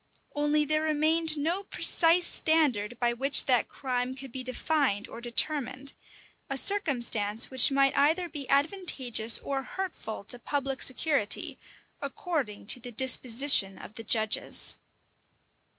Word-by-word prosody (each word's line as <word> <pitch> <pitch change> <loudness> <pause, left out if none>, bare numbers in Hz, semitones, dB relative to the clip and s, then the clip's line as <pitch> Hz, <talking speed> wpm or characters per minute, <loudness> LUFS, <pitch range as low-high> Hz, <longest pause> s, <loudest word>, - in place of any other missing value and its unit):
Only 295 +1 0
there 310 +1 -1
remained 315 +1 +2
no 330 +6 -2
precise 345 -2 +2
standard 250 -9 -1
by 240 -1 0
which 275 +4 +4
that 250 -4 +1
crime 255 -1 -4
could 270 -1 -10
be 260 - -6
defined 255 -4 -2
or 235 - -11
determined; 260 +2 0 0.6
a 275 - -2
circumstance 240 - +2
which 260 -3 +5
might 275 0 +1
either 320 +6 +1
be 290 -5 -9
advantageous 275 - +2
or 275 -1 -5
hurtful 330 - -8
to 245 +4 -4
public 275 0 -4
security, 270 -5 +1 0.4
according 280 - -5
to 235 - -1
the 245 0 -9
disposition 245 -3 +3
of - - -13
the 225 -1 -10
judges. 220 -1 0
270 Hz, 130 wpm, -27 LUFS, 240-305 Hz, 0.6 s, which